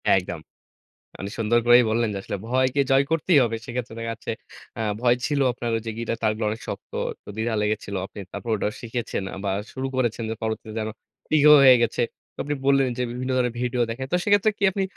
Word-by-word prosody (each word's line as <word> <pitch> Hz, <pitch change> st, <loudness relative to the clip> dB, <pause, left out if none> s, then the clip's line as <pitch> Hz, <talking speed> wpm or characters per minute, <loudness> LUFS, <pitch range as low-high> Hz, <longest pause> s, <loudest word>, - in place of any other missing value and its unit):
একদম। 90 Hz, -3 st, -2 dB, 0.8 s
মানে 100 Hz, -, -5 dB
সুন্দর 115 Hz, +1 st, +3 dB
করেই 120 Hz, +1 st, +7 dB
বললেন 115 Hz, +1 st, +1 dB
যে, -, -, -3 dB
আসলে 100 Hz, -, -4 dB
ভয়কে 130 Hz, +3 st, +2 dB
জয় 135 Hz, +1 st, +5 dB
করতেই 165 Hz, 0 st, +3 dB
হবে। 115 Hz, -1 st, -1 dB
সেক্ষেত্রে 120 Hz, -1 st, -5 dB
দেখা 115 Hz, 0 st, -3 dB
যাচ্ছে, 115 Hz, 0 st, -5 dB, 0.5 s
আ -, -, -3 dB, 0.2 s
ভয় 120 Hz, 0 st, +4 dB
ছিল 145 Hz, -2 st, 0 dB
আপনার 120 Hz, -1 st, -4 dB
ওইযে, 115 Hz, 0 st, -4 dB
গিটার 115 Hz, 0 st, -2 dB
তারগুলো 110 Hz, 0 st, 0 dB
অনেক 110 Hz, +1 st, -5 dB
শক্ত, -, -, -7 dB, 0.3 s
তো -, -, -15 dB
দ্বিধা 110 Hz, +1 st, -1 dB
লেগেছিল। 105 Hz, -1 st, -2 dB, 0.4 s
তারপর 120 Hz, -, -5 dB
ওটা 105 Hz, -, -1 dB
শিখেছেন 115 Hz, -4 st, -3 dB, 0.2 s
বা 100 Hz, -, 0 dB, 0.2 s
শুরু 130 Hz, 0 st, -3 dB
করেছেন 120 Hz, -3 st, 0 dB
যে, -, -, -1 dB
পরবর্তীতে 110 Hz, 0 st, -4 dB
যেন 110 Hz, 0 st, -2 dB, 0.5 s
ইগো 150 Hz, 0 st, +7 dB
হয়ে 130 Hz, -2 st, +9 dB
গেছে। 120 Hz, +1 st, +1 dB, 0.3 s
তো -, -, -54 dB
আপনি 145 Hz, +1 st, -1 dB
বললেন 135 Hz, -1 st, +4 dB
যে, -, -, +1 dB
বিভিন্ন 130 Hz, +2 st, -4 dB
ধরনের 125 Hz, -2 st, +1 dB
ভিডিও 125 Hz, 0 st, 0 dB
দেখেন। 130 Hz, +3 st, -4 dB
তো -, -, +4 dB
সেক্ষেত্রে 205 Hz, +1 st, +4 dB
কি 200 Hz, -, 0 dB
আপনি 195 Hz, -, -1 dB
120 Hz, 200 wpm, -24 LUFS, 110-130 Hz, 0.8 s, হয়ে